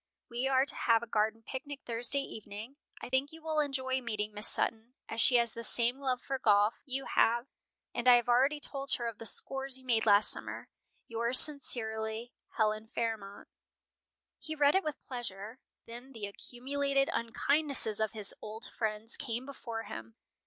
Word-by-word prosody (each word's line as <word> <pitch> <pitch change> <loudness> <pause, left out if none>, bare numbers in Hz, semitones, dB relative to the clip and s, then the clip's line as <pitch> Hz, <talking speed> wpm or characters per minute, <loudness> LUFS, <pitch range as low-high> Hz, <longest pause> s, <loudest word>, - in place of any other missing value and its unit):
We 245 +3 -1
are 265 0 +3
to - - 0
have 230 -1 +2
a - - -4
garden 220 0 -1
picnic 280 +1 -7
Thursday 240 +4 +7
evening. 215 +5 -9 0.3
I - - -4
think 260 +3 0
you 320 0 -13
will 315 -1 -1
enjoy 265 -3 -1
meeting 215 -3 -4
Miss 210 +1 +2
Sutton, 230 +3 0
as 225 - -2
she 250 - +3
has 235 -1 +3
the 230 - -8
same 240 +3 +3
love 255 -2 -2
for 270 -1 -3
golf 210 -1 +3
you 270 +1 -3
have, 235 +2 +2 0.5
and 240 - -3
I 250 - +9
have 240 -1 +1
already 265 +5 +3
told 275 -2 -2
her 240 - -2
of 230 -3 -7
the 225 - -6
scores 270 +4 0
you 260 - -12
made 225 -3 +1
last 205 0 +5
summer. - - -6 0.4
Yours 235 +2 +4
sincerely, 225 -5 +2 0.2
"HELEN 215 0 0
FAIRMONT." 220 -3 -5 0.9
He 315 - -6
read 290 -1 +4
it 385 - +2
with 305 -1 -5
pleasure. 230 -2 -7 0.3
Then 245 +4 -11
the 220 -3 -6
accumulated 275 +6 -2
unkindnesses 260 -1 +1
of 220 -1 -1
his 210 -3 -3
old 220 +3 -7
friends 220 +1 -2
came 240 -1 -4
before 230 -5 -7
him. 110 - -9
240 Hz, 175 wpm, -31 LUFS, 220-270 Hz, 0.9 s, I